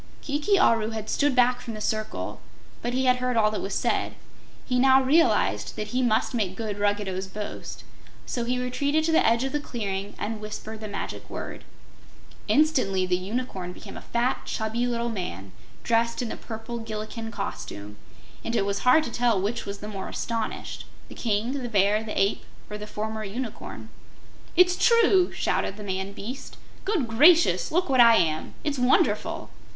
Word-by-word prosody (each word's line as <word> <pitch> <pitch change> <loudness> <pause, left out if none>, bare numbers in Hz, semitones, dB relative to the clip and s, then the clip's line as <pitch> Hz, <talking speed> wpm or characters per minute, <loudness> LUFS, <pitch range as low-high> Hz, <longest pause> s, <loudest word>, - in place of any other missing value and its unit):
Kiki 300 +8 +1
Aru 225 - +3
had 220 -1 -5
stood 290 -2 +2
back 250 0 +4
from 235 -3 -6
the - - -6
circle, 215 0 -3 0.4
but 245 +1 -2
he 260 0 +1
had 255 0 +4
heard 250 -1 -1
all 215 -1 +4
that 215 - -3
was 195 0 -3
said. - - 0 0.5
He 250 -1 +1
now 265 +1 +6
realized 325 +6 +2
that 210 - -4
he 250 +1 0
must 240 0 +2
make 200 -6 -1
good 210 -1 -4
Ruggedo's 205 -2 0
boast, 210 +2 -7 0.4
so 240 - -2
he 250 +2 0
retreated 280 +5 0
to 325 - +1
the 320 - +4
edge 230 +2 +3
of 270 - -2
the 295 - 0
clearing 205 -7 -4
and 215 0 -4
whispered 215 +1 -6
the 215 - -5
magic 205 - -6
word. - - -7 0.8
Instantly 255 -12 +3
the 180 0 +1
Unicorn 190 -2 -4
became - - -11
a - - -7
fat, 240 +2 0
chubby 225 +2 -1
little 235 -1 -1
man, 95 - -5 0.3
dressed 235 +1 +1
in 235 - -4
the - - -4
purple 225 +1 -6
Gillikin 225 0 -5
costume, 105 - -6 0.5
and 230 - -2
it 195 - +2
was 200 0 -1
hard 255 +6 +5
to 240 - -5
tell 235 -4 +2
which 210 +5 -2
was 200 0 -5
the 210 - -6
more 195 -3 -5
astonished, 230 -2 -4 0.2
the - - -9
King, 235 +5 -1
the 245 - -4
Bear, 205 0 +3
the 220 - -3
Ape 195 +1 +1 0.3
or 210 - -5
the 210 - -7
former 220 +1 -4
Unicorn. 220 +3 -6 0.7
"It's 360 0 +6
true!" 415 -6 +4
shorted 195 - -1
the 210 - -7
man 190 0 -3
beast. 255 +8 -7 0.3
"Good 365 - +1
gracious, 310 +10 +5
look 360 +3 +2
what 260 -3 +5
I 230 -1 +8
am! 155 -4 0
It's 290 -3 -1
wonderful!" 250 +1 +1
230 Hz, 180 wpm, -26 LUFS, 205-255 Hz, 0.8 s, I